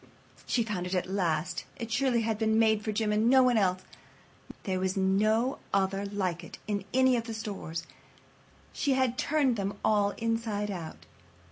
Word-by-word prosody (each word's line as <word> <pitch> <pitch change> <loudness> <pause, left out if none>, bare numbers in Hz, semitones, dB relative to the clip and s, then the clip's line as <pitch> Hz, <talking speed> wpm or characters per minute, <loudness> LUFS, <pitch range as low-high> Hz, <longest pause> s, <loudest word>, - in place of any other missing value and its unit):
She 235 - +2
found 195 -5 -3
it 185 - -2
at 180 - 0
last. 180 -2 -1
It 230 -1 -6
surely 245 -1 +2
had 220 -1 -1
been 220 0 +2
made 220 -1 +3
for 215 - -1
Jim 210 0 0
and 215 +2 +3
no 260 0 +6
one 250 -1 +3
else. 185 -3 +1 0.8
There 185 -1 -1
was 190 +1 -1
no 215 +6 +2 0.2
other 195 +1 0
like 185 -4 -2
it - - -10
in 200 -2 -2
any 260 0 +4
of 230 - -3
the 225 -1 -5
stores, 195 -6 -5
and - - -19 0.8
she 280 - +1
had 260 -2 +1
turned 275 -5 +1 0.3
all 205 -2 +3
of - - -9
them 230 - -5
inside 220 -3 -1
out. 170 -4 -7
210 Hz, 190 wpm, -29 LUFS, 190-230 Hz, 0.8 s, no